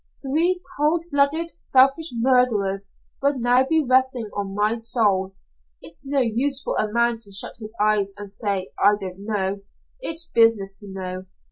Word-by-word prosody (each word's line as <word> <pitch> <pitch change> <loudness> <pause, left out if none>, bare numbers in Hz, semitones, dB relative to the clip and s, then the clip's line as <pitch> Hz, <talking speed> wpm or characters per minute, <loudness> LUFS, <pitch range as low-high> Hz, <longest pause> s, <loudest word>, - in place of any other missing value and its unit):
Three 330 +7 +1 0.2
coldblooded, 315 0 +1
selfish 270 +5 +3
murders 230 -5 +1 0.3
would 280 +1 +2
now 245 +2 +3
be 320 -2 +2
resting 255 -4 +1
on 195 -1 -4
my 210 +2 +1
soul. 205 -5 +1 0.4
It's 170 +12 -9
no 275 -1 +1
use 255 +4 0
for - - -3
a 215 -1 -1
man 235 0 +1
to 210 -3 -4
shut 195 - +2
his 215 0 -7
eyes 210 -1 +2
and 205 0 -7
say 200 -2 -3
'I 205 +1 +6
didn't 190 0 -7
know.' 200 -2 -1 0.4
It's 330 -9 -1
his - - -16
business 225 -4 +3
to 205 - -10
know. 185 -1 -5
230 Hz, 160 wpm, -22 LUFS, 200-270 Hz, 0.4 s, I